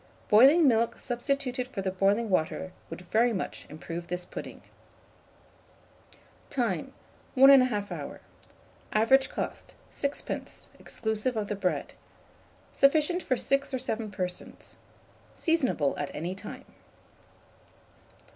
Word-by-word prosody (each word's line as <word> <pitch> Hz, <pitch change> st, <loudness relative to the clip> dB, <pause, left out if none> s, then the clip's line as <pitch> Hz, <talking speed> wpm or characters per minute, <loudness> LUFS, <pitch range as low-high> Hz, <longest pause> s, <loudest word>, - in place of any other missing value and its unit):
Boiling 275 Hz, +9 st, +7 dB
milk 230 Hz, -2 st, +2 dB
substituted 250 Hz, 0 st, -2 dB
for 225 Hz, -7 st, -5 dB
the 190 Hz, -, -1 dB
boiling 200 Hz, +4 st, +1 dB
water 185 Hz, +1 st, 0 dB, 0.2 s
would -, -, -7 dB
very 235 Hz, +2 st, +4 dB
much 195 Hz, -, -4 dB
improve 165 Hz, +3 st, -7 dB
this 180 Hz, 0 st, -4 dB
pudding. -, -, -8 dB, 1.9 s
Time. -, -, -1 dB, 0.4 s
1 270 Hz, +1 st, +8 dB
1/2 250 Hz, -7 st, +4 dB
hour. -, -, -6 dB, 0.7 s
Average 265 Hz, +5 st, +4 dB
cost, -, -, -5 dB, 0.2 s
6d., 280 Hz, 0 st, -4 dB
exclusive 220 Hz, +2 st, -2 dB
of 210 Hz, -2 st, -2 dB
the 210 Hz, -, -1 dB
bread. 190 Hz, -2 st, -2 dB, 0.8 s
Sufficient 310 Hz, +5 st, +3 dB
for 255 Hz, -, 0 dB
6 275 Hz, +1 st, 0 dB
or -, -, 0 dB
7 225 Hz, -4 st, -3 dB
persons. 180 Hz, -2 st, -6 dB, 0.6 s
Seasonable 265 Hz, -, +1 dB
at 145 Hz, -, -2 dB
any 170 Hz, +4 st, -3 dB
time. 190 Hz, -, -9 dB
225 Hz, 110 wpm, -28 LUFS, 190-270 Hz, 1.9 s, 1